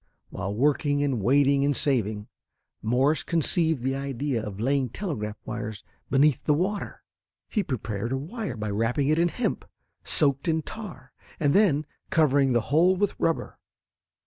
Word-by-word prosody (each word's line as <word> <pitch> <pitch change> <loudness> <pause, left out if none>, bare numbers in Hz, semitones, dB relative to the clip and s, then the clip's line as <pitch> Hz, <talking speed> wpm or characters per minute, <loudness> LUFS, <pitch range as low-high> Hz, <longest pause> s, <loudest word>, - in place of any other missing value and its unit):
While 95 +3 -4
working 145 +3 +2
and 135 -6 0
waiting 140 +4 +3
and 145 -1 +1
saving, 110 -7 0 0.5
Morse 130 +7 +2
conceived 160 -4 +1
the 135 +1 0
idea 135 -2 -2
of 105 -2 -6
laying 135 +2 +1
telegraph 110 - -4
wires 110 -1 -5 0.3
beneath 140 0 +3
the 150 - +3
water. 195 +6 -2 0.5
He 215 - +1
prepared 115 - -3
a 135 - 0
wire 170 - -5
by 105 -1 -3
wrapping 120 +7 0
it 155 +1 +3
in 170 - +4
hemp 245 +8 -2 0.4
soaked 140 -1 +1
in 160 -1 +1
tar, 160 -13 -9 0.3
and 145 -2 +2
then 165 -8 +3 0.2
covering 140 -4 +3
the 120 - +3
whole 170 +9 +3
with 200 +1 0
rubber. 165 - -1
140 Hz, 150 wpm, -26 LUFS, 120-160 Hz, 0.5 s, in